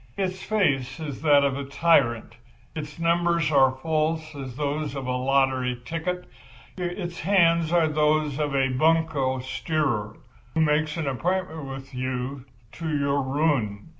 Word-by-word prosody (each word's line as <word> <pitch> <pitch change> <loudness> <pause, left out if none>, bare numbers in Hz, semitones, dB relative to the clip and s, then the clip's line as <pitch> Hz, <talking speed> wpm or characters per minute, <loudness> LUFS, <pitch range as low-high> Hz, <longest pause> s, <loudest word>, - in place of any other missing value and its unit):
Its 190 -1 -2
face 140 -11 0
is 150 -4 -6
that 145 -2 +5
of 140 -1 +1
a 140 - -4
tyrant, 135 -6 +2 0.4
its 150 -1 -6
numbers 170 -1 +1
are 135 -2 +4
false 155 0 0
as 135 -4 -7
those 145 0 -2
on 135 -1 -4
a 125 0 -1
lottery 130 -1 +1
ticket; 180 +4 -3 0.5
its 175 -1 -4
hands 170 -3 +3
are 170 -2 +4
those 150 -1 +1
of 145 -2 -1
a 135 -1 +2
bunco 150 -1 +2
steerer, 130 - -2 0.4
who 160 - +3
makes 150 0 +1
an 160 - -2
appointment 160 +3 -2
with 135 0 -8
you 130 +1 -4 0.3
to 165 -1 -5
your 140 -1 +1
ruin. 135 -5 0
150 Hz, 145 wpm, -25 LUFS, 135-165 Hz, 0.5 s, that